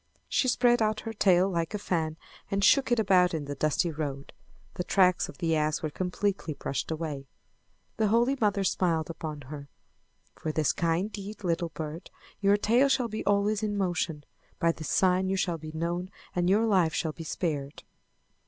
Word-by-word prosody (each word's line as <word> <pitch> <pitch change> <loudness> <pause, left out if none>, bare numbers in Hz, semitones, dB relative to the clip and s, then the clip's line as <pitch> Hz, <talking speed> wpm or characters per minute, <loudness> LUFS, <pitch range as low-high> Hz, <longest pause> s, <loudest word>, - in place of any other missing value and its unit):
She 260 - +1
spread 245 -1 +3
out 215 0 +1
her 225 - -5
tail 190 -3 +4
like 170 +1 -2
a - - 0
fan 160 -5 -2 0.3
and 200 0 0
shook 270 +4 +4
it 240 - +4
about 185 -4 +4
in 150 -2 -3
the 145 - -4
dusty 155 +4 0
road. 145 -3 -5 0.4
The 180 - -3
tracks 185 -1 +3
of - - -11
the 165 -2 +1
ass 155 0 0
were 155 - -2
completely 185 -2 -2
brushed 140 - -3
away. 155 -4 -4 0.7
The 220 -1 +2
Holy 235 +5 +3
Mother 205 -2 +2
smiled 170 -3 0
upon 155 -2 -6
her. 140 +1 -9 0.6
"For 155 - -4
this 155 -1 +1
kind 170 +5 0
deed, 205 0 -8
little 170 -1 0
bird, 160 +2 -7 0.3
your 200 0 +4
tail 240 +7 +3
shall 255 -3 +1
be 215 0 -4
always 205 +1 +2
in 210 -1 -1
motion. 175 -5 -1 0.3
By 170 - +3
this 160 -2 -7
sign 185 0 +2
you 195 - +1
shall 175 -3 -1
be 155 0 -8
known 170 +3 -3 0.3
and 175 0 +1
your 210 +4 +4
life 185 -7 +2
shall 160 -2 -1
be 165 - -8
spared." 150 -4 -3
180 Hz, 185 wpm, -28 LUFS, 160-205 Hz, 0.7 s, tail